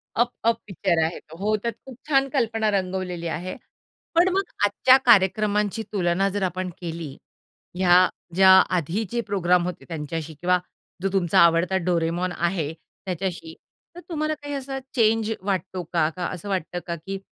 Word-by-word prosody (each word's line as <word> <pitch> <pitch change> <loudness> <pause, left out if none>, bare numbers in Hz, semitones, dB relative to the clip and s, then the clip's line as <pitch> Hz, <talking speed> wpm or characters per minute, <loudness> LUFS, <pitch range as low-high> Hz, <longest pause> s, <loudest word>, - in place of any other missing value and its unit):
Up, 240 +1 +2
up 230 0 +3
picture 175 -3 +1
आहे 160 +2 -2
तो. 160 +1 -15
हो, 210 +4 +1
त्यात 235 -2 -1
खूप 260 -3 -11
छान 275 -2 +3
कल्पना 225 -5 +1
रंगवलेली 185 -3 -2
आहे. 175 +3 -4 0.6
पण 350 +2 +5
मग 390 - +2 0.2
आजच्या 255 +6 +5
कार्यक्रमांची 210 0 +3
तुलना 185 0 +1
जर 200 0 -2
आपण 185 0 -2
केली, 165 -4 -6 0.6
ह्या 180 0 +5 0.3
ज्या 190 0 +6 0.3
आधीचे 200 +8 -2
प्रोग्राम 180 -5 +1
होते 180 -2 -6
त्यांच्याशी 160 0 -5
किंवा 180 +1 +3 0.4
जो 195 - 0
तुमचा 180 -4 +3
आवडता 170 +2 +4
डोरेमॉन 175 +1 0
आहे 170 -3 -1 0.3
त्याच्याशी, 180 -3 -4 0.4
तर - - -8
तुम्हाला 310 -2 -1
काही 290 -1 -7
असा 270 0 -4 0.2
चेंज 225 -2 +2
वाटतो 190 -2 -2
का? 160 -3 +3
का 175 +2 -5
असं 185 +3 -7
वाटतं 180 -2 -2
का, 170 - -2
की 195 +4 -6
185 Hz, 155 wpm, -24 LUFS, 175-215 Hz, 0.6 s, ज्या